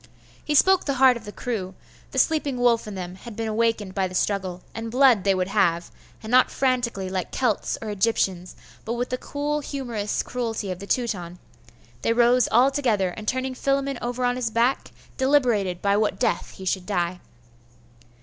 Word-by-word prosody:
He 295 - -1
spoke 380 +5 +5
the 275 - 0
heart 260 -1 +6
of 230 -2 -9
the 205 - -7
crew; 200 -6 -4 0.3
the - - -8
sleeping 295 -5 +1
wolf 240 -2 +2
in 210 - -6
them 180 -1 -5
had 210 +4 -10
been 225 +1 -3
awakened 220 -3 0
by 190 -1 0
the 185 - -9
struggle, 185 -2 -1
and 225 0 -5
blood 250 -4 +4
they 195 -1 +3
would 185 0 -1
have; 170 -3 +1 0.3
and 220 - -6
not 255 0 +5
frantically, 245 -7 0
like 185 -1 -3
Celts 245 -6 -1
or 220 - -4
Egyptians, 190 -3 0 0.3
but 230 - -3
with 245 +1 -2
the 255 - -2
cool 295 +1 -2
humorous 240 -8 -3
cruelty 225 -5 -3
of 180 - -5
the 200 - -9
Teuton, 185 -9 -2 0.6
they 230 - +1
rose 240 +1 +4
altogether, 245 -6 +3
and 215 +4 -9
turning 260 +2 -1
Philammon 275 0 -1
over 245 +1 -2
on 245 0 +1
his 245 -3 -1
back, 235 +4 +1 0.3
deliberated 240 -10 +2
by 200 0 +3
what 210 -2 +1
death - - -1
he 190 - -8
should 185 -1 -1
die. 180 -3 -1
230 Hz, 185 wpm, -24 LUFS, 195-255 Hz, 0.6 s, heart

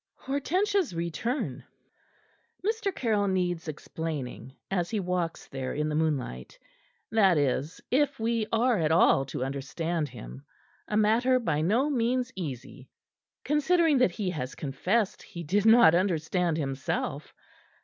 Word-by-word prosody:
HORTENSIA'S 360 - 0
RETURN 170 - -3 1.0
Mr. 435 -2 0
Caryll 215 -4 +1
needs 180 -3 -1
explaining 145 -5 -5 0.2
as 175 -3 0
he 220 - -1
walks 180 -3 -2
there 130 -1 -4
in 150 +1 -1
the 150 - -2
moonlight; 135 - -2 0.5
that 195 -6 +4
is, 145 +3 0
if 275 +1 +2
we 225 -1 0
are 230 -1 +2
at 160 -1 +1
all 160 -4 +4
to 130 - -4
understand 150 +4 -3
him - - -10 0.4
a 210 - 0
matter 230 +4 +3
by 165 -11 0
no 225 - +2
means 250 0 0
easy, 135 -6 -7 0.5
considering 300 0 +3
that 250 - +5
he 190 -2 -2
has 135 -6 -5
confessed 185 +10 -1
he 170 - -8
did 200 +7 +1
not 225 -7 +8
understand 175 -1 +1
himself. 135 0 -3
180 Hz, 130 wpm, -28 LUFS, 150-235 Hz, 1.0 s, not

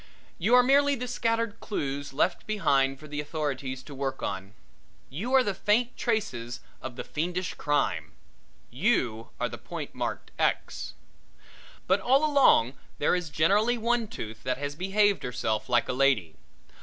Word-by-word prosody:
You 215 +8 +4
are 250 - +7
merely 280 +2 +4
the 250 -1 -4
scattered 230 -2 -1
clews 140 -8 -3
left 135 - 0
behind 135 -10 +2
for 150 - -11
the 145 0 -3
authorities 140 -4 -3
to 145 - -10
work 135 -1 -3
on; 95 +3 -4 0.6
you 195 - -4
are 260 - +6
the 205 - -1
faint 220 +6 +1
traces 130 - -2 0.2
of 130 -2 -6
the - - -5
fiendish 175 +3 -2
crime. 135 - -1 0.6
You 125 - 0
are - - +1
the - - -8
point - - -7
marked - - -4
X. - - -1 0.9
But 190 +2 +3
all 270 +8 +3
along 275 - +5 0.2
there - - +2
is 180 -3 -3
generally 200 +11 +3
one 235 0 +1
tooth 110 - -7
that 130 0 -1
has 145 +1 -3
behaved 200 +4 +2
herself 110 -3 -2
like 120 -1 +3
a - - -1
lady. 125 - +2
155 Hz, 155 wpm, -28 LUFS, -, 0.9 s, are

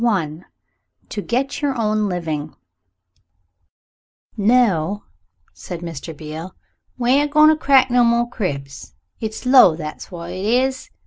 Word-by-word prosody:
CHAPTER 190 -10 +1
V 160 +4 -14 0.7
"TO 205 - -4
GET 265 +7 -2
YOUR 280 -3 -1
OWN 215 -1 0
LIVING" 160 -4 -4 1.8
"NO," 205 -4 +2 0.5
said 175 -2 -8
Mr. 165 -2 -7
Beale, 155 +4 -8 0.4
"we 245 0 +1
ain't 290 +2 +3
a - - -19
goin' 305 0 +7
to 315 - +4
crack 270 -4 +3
no 245 0 +4
more 235 0 +2
cribs. 140 - -5 0.2
It's 220 +2 -5
low 250 -10 +7
that's 155 -1 -7
what 170 -1 -8
it 185 +1 -5
is. 255 +4 0
210 Hz, 140 wpm, -20 LUFS, 165-250 Hz, 1.8 s, goin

